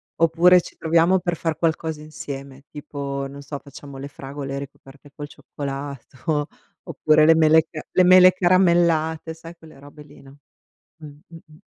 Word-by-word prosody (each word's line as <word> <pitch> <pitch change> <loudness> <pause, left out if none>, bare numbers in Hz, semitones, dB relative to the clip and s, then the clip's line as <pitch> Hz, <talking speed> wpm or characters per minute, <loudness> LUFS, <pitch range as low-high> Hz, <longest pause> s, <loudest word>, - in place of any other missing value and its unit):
Oppure 170 +2 +4
ci - - -14
troviamo 165 +3 +2
per 175 -1 -3
far 160 -1 -3
qualcosa 160 -2 -2
insieme, 140 -3 -9
tipo, 140 -1 -6
non 140 +1 -11
so, 140 0 -7
facciamo 140 -1 -12
le 140 - -7
fragole 140 0 -7
ricoperte 140 +1 -12
col 145 0 -8
cioccolato, 140 +1 -6 0.4
oppure 155 0 +2
le 165 - +6
mele 160 0 +4
ca 155 - -7
le 185 - +3
mele 185 0 +7
caramellate, 170 -3 +1
sai 165 +1 -12
quelle 160 -3 -17
robe 145 +1 -14
lì, 145 0 -18
no. 140 +1 -17 0.6
Mh. 160 - -13 0.2
mh-mh. 160 -2 -16
155 Hz, 155 wpm, -22 LUFS, 140-165 Hz, 0.6 s, mele